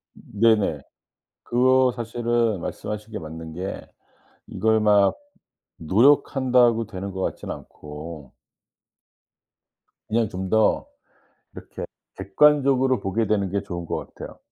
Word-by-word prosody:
네네. 105 -7 +1 0.6
그거 130 +1 +3
사실은 115 -3 -1
말씀하신 105 +5 -6
게 - - -5
맞는 80 0 -8
게 95 +3 -5 0.7
이걸 110 0 +1
막 105 -2 +4 0.6
노력한다고 120 - +3
되는 100 -2 -6
것 95 - -6
같진 - - -4
않고 75 -1 -9 1.8
그냥 115 -1 +1
좀 95 +1 -5
더 110 +1 +2 0.7
이렇게 - - -8 0.3
객관적으로 135 +2 +3
보게 100 +3 -1
되는 100 -2 0
게 100 - -1
좋은 85 -3 -6
것 - - -5
같아요. - - -10
105 Hz, 220 characters per minute, -23 LUFS, 95-120 Hz, 1.8 s, 막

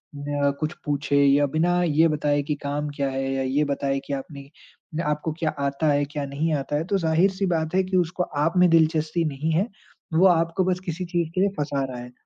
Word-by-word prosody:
म 145 0 -3
अ, - - +3
कुछ 155 +1 -2
पूछे 145 -1 0
या 140 +1 +4
बिना 175 +2 +2
ये 160 0 +4
बताए 145 -1 +1
कि 150 +1 -2
काम 145 +1 -2
क्या 140 -1 0
है 135 0 -2
या 135 - -1
ये 135 +3 +1
बताए 135 0 -1
कि 140 - -4
आपने 140 0 -7 0.5
न 165 - 0
आपको 150 +2 -1
क्या 160 - +1
आता 140 +2 0
है, 145 0 +1
क्या 145 0 -4
नहीं 145 +4 -1
आता 140 +1 -3
है 150 - 0
तो 195 +2 0
ज़ाहिर-सी 185 +3 +2
बात 160 -2 -1
है 190 - +3
कि 185 0 -1
उसको 180 +1 0 0.2
आप 165 - +1
में 180 0 +6
दिलचस्पी 160 0 +2
नहीं 150 +2 -2
है। 185 +7 +1 0.5
वो 170 +4 +5
आपको 170 +1 +2
बस 180 -1 0
किसी 180 +1 -3
चीज़ 170 -2 -1
के 185 - +2
लिए 200 - +3
फँसा 145 -2 -1
रहा 130 -2 -7
है। 125 0 -9
155 Hz, 230 wpm, -24 LUFS, 140-170 Hz, 0.5 s, में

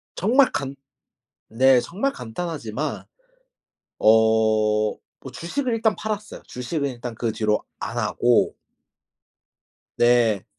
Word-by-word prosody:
정말 250 +8 +3
간 135 0 -3 0.7
네 130 +2 +4
정말 225 - -2
간단하지만 140 0 -5 1.0
어 110 -1 +3 0.2
뭐 - - -10
주식을 250 +8 -3
일단 225 -1 +1
팔았어요. 215 -1 -5
주식은 140 +3 -3
일단 120 -1 -7
그 115 0 -2
뒤로 105 -1 0 0.2
안 - - -5
하고. 120 -1 +2 1.4
네. 120 -4 +3
125 Hz, 195 characters per minute, -23 LUFS, 110-175 Hz, 1.4 s, 네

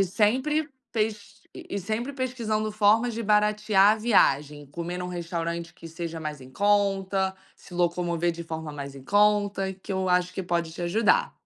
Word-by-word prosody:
E 195 - +5
sempre 260 - +1 0.2
pes 210 -2 -2
e - - -29 0.3
e - - 0
sempre 225 +8 -3
pesquisando 230 -5 -2
formas 215 +3 +3
de 230 - -3
baratear 210 -1 +4
a - - 0
viagem, 150 - +2
comer 170 +5 -5
em - - -4
um 180 - -4
restaurante 170 -1 -4
que 165 - -11
seja 165 0 -6
mais 150 -2 -5
em 130 - -13
conta, 195 +1 +1 0.2
se - - -17
locomover 175 -1 0
de 170 0 -6
forma 160 -1 -5
mais 140 -1 -7
em 135 - -11
conta, 205 +2 +2
que 190 +1 -13
eu 190 0 -1
acho 180 0 +1
que 190 - -3
pode 170 -2 -1
te 175 - -6
ajudar. 225 - +2
190 Hz, 185 wpm, -26 LUFS, 170-210 Hz, 0.3 s, E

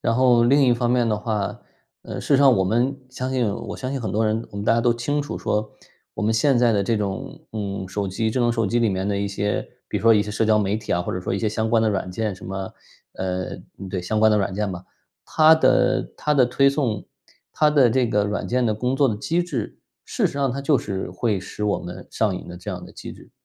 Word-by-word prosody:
然 115 - +1
后 125 -1 +4
另 140 +4 +4
一 125 - +4
方 120 0 0
面 120 -2 +2
的 105 - +1
话， 105 -2 -3 0.4
呃， - - -6
事 - - -8
实 140 - +5
上 135 -3 +6
我 95 - +2
们 120 +8 +1
相 130 0 -4
信 125 -4 +1
我 115 +1 -6
相 130 - -4
信 135 - -3
很 110 - -3
多 110 +1 +1
人， 110 +2 -1
我 - - -9
们 100 - -4
大 115 - +4
家 115 - +2
都 120 0 +3
清 130 +5 -1
楚 145 - -5
说 105 0 -2 0.4
我 - - -4
们 110 +1 +2
现 135 +2 +3
在 120 -1 +4
的 100 -2 +2
这 115 +3 0
种， 100 -2 -5
嗯， 100 -3 -4
手 100 +1 -3
机 110 +4 -1
智 125 - -1
能 120 -1 +3
手 115 -2 0
机 120 +5 +1
里 115 - +3
面 95 0 -2
的 100 -1 0
一 100 0 -1
些， 105 +1 -2 0.2
比 - - -2
如 - - -3
说 115 0 +6
一 105 - +4
些 105 - -6
社 105 +2 0
交 110 0 +4
媒 100 0 0
体 110 - -4
啊， 85 - +1
或 - - -4
者 90 - -3
说 - - -3
一 95 - 0
些 110 - 0
相 110 +1 -2
关 115 -1 +4
的 110 - +2
软 95 -3 -2
件 105 +2 -2
什 95 - -13
么 95 0 -5 0.4
呃， 95 -1 -3 0.3
对， 95 -1 -3
相 110 +5 -1
关 110 0 +5
的 - - +4
软 100 -1 -1
件 105 +1 -1
嘛。 90 -1 -6 0.4
它 155 +1 +6
的 130 -4 +2
它 150 - 0
的 130 -3 +5
推 140 +3 +3
送、 130 -8 -1 0.5
它 150 -1 +3
的 140 -5 +5
这 125 +2 +2
个 105 -2 +1
软 105 0 -3
件 125 0 +1
的 110 - +1
工 125 +5 -1
作 140 0 +4
的 110 - -1
机 165 +11 0
制， 145 -11 -4 0.3
事 - - 0
实 - - -5
上 140 -2 0
它 135 +3 -4
就 140 +1 +3
是 95 -7 -4
会 100 +3 -1
使 95 +2 -8
我 105 -1 +1
们 90 0 -9
上 105 -4 0
瘾 - - -9
的 90 - -8
这 90 - -10
样 - - -6
的 - - -13
机 - - -9
制。 - - -16
110 Hz, 295 characters per minute, -23 LUFS, 100-125 Hz, 0.5 s, 上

